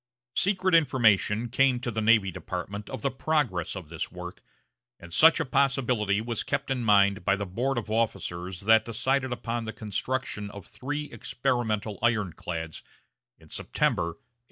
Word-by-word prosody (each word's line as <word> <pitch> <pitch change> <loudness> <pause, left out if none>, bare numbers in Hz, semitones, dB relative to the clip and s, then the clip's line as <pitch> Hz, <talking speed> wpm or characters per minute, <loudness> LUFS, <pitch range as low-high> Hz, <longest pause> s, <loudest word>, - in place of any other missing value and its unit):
Secret 185 -1 +2
information 120 - +3
came 130 +1 +3
to 120 -1 -3
the 110 0 -2
Navy 110 -3 +4
Department 95 +4 -6
of - - -6
the 140 - +1
progress 130 - -1
of 90 -6 -8
this 85 -1 -5
work, 90 0 -8 0.6
and 85 0 -11
such 160 - +6
a 165 - 0
possibility 125 -7 +1
was 115 0 -2
kept 145 -1 -2
in 125 -2 -1
mind 100 -2 +4
by 100 - +3
the 100 0 -3
board 120 +8 -1
of 110 -2 -3
officers 95 -5 -2
that 110 +2 +5
decided 130 +3 0
upon 120 -1 -3
the 110 - -5
construction 110 0 -3
of 100 -2 -9
the - - -18
three 145 +3 -5
experimental 115 -3 -2
ironclads 90 -8 -2 0.6
in - - -20
September, - - 0
1861. 85 0 -8
110 Hz, 160 wpm, -27 LUFS, 100-130 Hz, 0.6 s, such